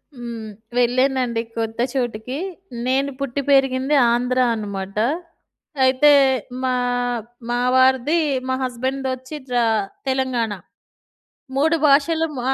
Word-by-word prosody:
హ్మ్. 235 Hz, -3 st, -7 dB, 0.3 s
వెళ్ళానండి 250 Hz, -1 st, +2 dB, 0.2 s
కొత్త 225 Hz, 0 st, -3 dB
చోటికి. 245 Hz, -1 st, -3 dB, 0.5 s
నేను 275 Hz, +2 st, +1 dB
పుట్టి 275 Hz, 0 st, -2 dB
పెరిగింది 270 Hz, +1 st, +3 dB, 0.2 s
ఆంధ్రా 250 Hz, +1 st, +2 dB
అనమాట. 200 Hz, -2 st, -5 dB, 0.9 s
అయితే 260 Hz, +3 st, +5 dB, 0.5 s
మా 255 Hz, -1 st, +1 dB, 0.4 s
ఆహ్, 230 Hz, -, -4 dB, 0.3 s
మా 240 Hz, 0 st, 0 dB, 0.2 s
వారిది 260 Hz, +4 st, +4 dB, 0.3 s
మా 260 Hz, -, +1 dB
హస్బెండ్‌ 260 Hz, +2 st, -2 dB
దొచ్చి 260 Hz, +3 st, -4 dB
త్రా 245 Hz, -1 st, +2 dB, 0.4 s
తెలంగాణ. 260 Hz, -4 st, 0 dB, 1.0 s
3 320 Hz, +4 st, +3 dB
భాషలు‌ 320 Hz, +3 st, +3 dB
హ్మ్, 265 Hz, -, -5 dB
255 Hz, 105 wpm, -21 LUFS, 240-270 Hz, 1.0 s, అయితే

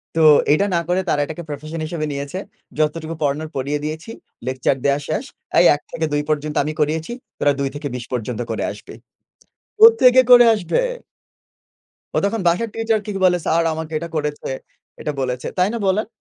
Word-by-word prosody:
তো -, -, +1 dB, 0.3 s
এইটা 175 Hz, +7 st, +3 dB
না -, -, +3 dB
করে 185 Hz, +1 st, +2 dB
তারা 145 Hz, -, +2 dB
এটাকে 160 Hz, +3 st, -7 dB
profession 155 Hz, +3 st, -6 dB
হিসেবে 155 Hz, -1 st, -3 dB
নিয়েছে। 140 Hz, +6 st, -4 dB, 0.4 s
যতটুকু 155 Hz, +1 st, -1 dB
পড়ানোর 150 Hz, +2 st, -1 dB
পড়িয়ে 140 Hz, +2 st, -2 dB
দিয়েছি, 160 Hz, +8 st, -5 dB, 0.4 s
lecture 130 Hz, +1 st, 0 dB
দেওয়া 140 Hz, +1 st, +3 dB
শেষ। 160 Hz, -, -2 dB, 0.4 s
এই 175 Hz, -, +6 dB
১ 145 Hz, -, -10 dB
থেকে 160 Hz, -, -2 dB
২ 145 Hz, -, +2 dB
পর্যন্ত 150 Hz, -1 st, -1 dB
আমি 155 Hz, +1 st, -3 dB
করিয়েছি। 160 Hz, +6 st, 0 dB, 0.3 s
তোরা 145 Hz, -, +3 dB
২ 135 Hz, -1 st, 0 dB
থেকে 145 Hz, 0 st, -4 dB
২০ 120 Hz, -1 st, -6 dB
পর্যন্ত 120 Hz, 0 st, -3 dB
করে -, -, -2 dB
আসবি। -, -, -11 dB, 0.9 s
কোত্থেকে 430 Hz, -, +7 dB
করে 245 Hz, -1 st, +9 dB
আসবে? 195 Hz, -, 0 dB, 1.4 s
ও -, -, +2 dB
তখন 220 Hz, 0 st, -1 dB
বাসার 195 Hz, +7 st, +1 dB
teacher 225 Hz, -1 st, 0 dB
কে -, -, -7 dB
কি -, -, -2 dB
বলে, 180 Hz, -1 st, +4 dB
"স্যার 165 Hz, +1 st, +2 dB
আমাকে 160 Hz, 0 st, -6 dB
এটা 170 Hz, +1 st, -6 dB
করেছে, 150 Hz, -1 st, -3 dB, 0.5 s
এটা 150 Hz, -, -2 dB
বলেছে।" 125 Hz, -1 st, -2 dB
তাই 180 Hz, +1 st, +3 dB
না -, -, -2 dB
বলেন? 205 Hz, +3 st, +1 dB
155 Hz, 180 wpm, -20 LUFS, 145-185 Hz, 1.4 s, করে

